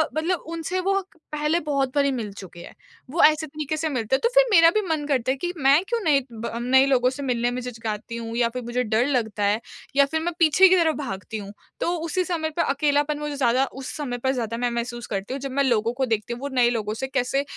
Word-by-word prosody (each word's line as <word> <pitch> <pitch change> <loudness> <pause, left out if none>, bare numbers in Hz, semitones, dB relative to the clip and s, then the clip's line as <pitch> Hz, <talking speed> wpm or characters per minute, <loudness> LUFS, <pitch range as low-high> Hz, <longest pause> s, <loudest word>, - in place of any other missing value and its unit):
मतलब 335 +3 -1
उनसे 335 +3 -2
वो 390 +2 +1 0.4
पहले 300 +2 +1
बहुत 275 -4 -1
बारी 280 -1 +3
मिल 230 -6 -4
चुके 190 -3 -11
हैं, 170 - -11 0.3
वो 330 +6 +2
ऐसे 310 +1 +4
तरीके 305 +1 -4
से 315 0 -1
मिलते 250 -3 0
हैं। - - -2
तो 470 - +4
फिर - - +7
मेरा 330 -4 +7
भी 430 - +3
मन 310 -2 -1
करता 260 -3 +1
है 270 - -2
कि 350 +5 -3
मैं 280 +3 +4
क्यों 470 -1 0
नए 280 -4 +3
ब 225 0 -5
नए 265 +2 +5
लोगों 250 -2 +3
से 270 +2 -6
मिलने 245 -2 0
में 250 +1 -3
झिझकाती 230 -2 -5
हूँ 230 0 -6
या 235 -1 +2
फिर 250 +1 -6
मुझे 240 +1 -1
डर 220 +1 +1
लगता 220 -7 -1
है 205 +2 +2 0.4
या 280 0 +6
फिर 320 +3 -2
मैं 345 +2 -2
पीछे 330 +3 +6
की 370 - +5
तरफ 320 -3 +2
भागती 215 - -5
हूँ 200 -1 -8 0.3
तो 345 - 0 0.2
उसी 365 +3 0
समय 320 -2 -2
पे - - +3
अकेलापन 290 +1 +1
मुझे 295 -1 -4
ज़्यादा 260 -1 +2 0.2
उस 260 - -6
समय 265 -5 -3
पर 260 +2 0
ज़्यादा 230 -3 -3
मैं 245 0 0
महसूस 240 0 -4
करती 195 +4 -4
हूँ 275 - -4
जब 275 0 -4
मैं 280 +2 +1
लोगों 230 -3 +1
को 265 +1 -1
देखती 225 -1 -2
हूँ 240 - -8
वो 280 - -3
नए 245 -2 +4
लोगों 215 -3 -2
से 265 +4 -4
कैसे 270 +1 0
265 Hz, 255 wpm, -24 LUFS, 235-300 Hz, 0.4 s, फिर